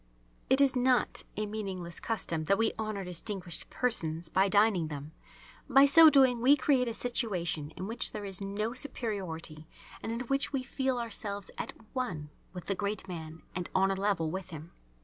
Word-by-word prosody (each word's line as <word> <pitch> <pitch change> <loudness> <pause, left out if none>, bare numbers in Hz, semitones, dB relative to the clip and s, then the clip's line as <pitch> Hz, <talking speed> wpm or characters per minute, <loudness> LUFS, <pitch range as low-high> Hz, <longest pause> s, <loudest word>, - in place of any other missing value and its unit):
It 265 +1 +4
is 275 -1 +4
not 250 -1 +2
a 215 - 0
meaningless 195 -5 -5
custom 165 -8 -2
that 195 +5 +3
we 225 - +2
honour 215 -3 -3
distinguished 180 0 -4
persons 165 -9 -1
by 190 +1 +3
dining 200 -4 +3
them. 150 0 -7 0.6
By 270 +1 +7
so 320 +3 +9
doing 260 -5 +4
we 270 +4 +6
create 265 -3 +2
a 230 - -2
situation 180 - -1
in 185 - -4
which 225 +4 -1
there 210 -1 -6
is 195 -1 -2
no 205 +3 -2
superiority 185 - -3 0.3
and 225 - -4
in 230 +1 -3
which 275 +3 -1
we 270 -3 -1
feel 260 0 -1
ourselves 205 -4 -4
at - - -4 0.2
one 170 - -3 0.2
with 180 -2 -8
the 195 - 0
great 200 0 -3
man 160 -3 -8
and 180 -1 -4
on 195 +1 +3
a - - 0
level 190 -5 0
with 190 0 -5
him. 160 0 -9
200 Hz, 180 wpm, -30 LUFS, 175-245 Hz, 0.6 s, so